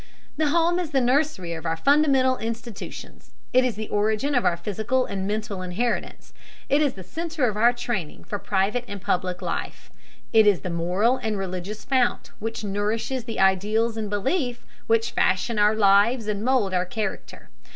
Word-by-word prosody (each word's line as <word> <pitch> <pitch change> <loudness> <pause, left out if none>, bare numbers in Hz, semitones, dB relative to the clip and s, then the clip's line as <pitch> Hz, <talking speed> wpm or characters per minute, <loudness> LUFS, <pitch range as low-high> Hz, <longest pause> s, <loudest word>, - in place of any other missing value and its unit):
The 315 - +1
home 340 +3 +2
is 350 -4 -3
the 280 -3 +2
nursery 250 - +1
of 160 -1 -7
our 165 -1 -1
fundamental 275 - +3
institutions: 230 -1 -7 0.2
it 255 +1 +5
is 250 -4 0
the 215 0 -5
origin 215 +7 0
of 245 - +2
our 170 - +2
physical 220 +8 -1
and 195 -1 -4
mental 210 -2 -3
inheritances; 195 +7 -3 0.4
it 285 +2 +3
is 285 -4 +2
the 190 - -10
center 315 - -2
of 215 - -2
our 235 +3 +5
training 240 -9 -4
for 205 - -5
private 205 +6 0
and 200 - -6
public 180 -1 -2
life; - - -5 0.4
it 220 -1 +6
is 195 -7 +4
the 180 - -4
moral 180 +9 +1
and 220 -3 -2
religious 190 +2 -5
fount 255 -3 +1
which 225 0 -4
nourishes 215 +5 -2
the 230 - -5
ideals 210 +4 +2
and 220 -2 -3
beliefs 245 - -1 0.2
which 225 +1 +2
fashion 210 +4 +1
our 210 +1 +4
lives 210 +3 +4
and 210 -1 -2
mould 240 -6 +2
our 180 -1 +2
character. 195 - -5
220 Hz, 175 wpm, -24 LUFS, 195-250 Hz, 0.4 s, it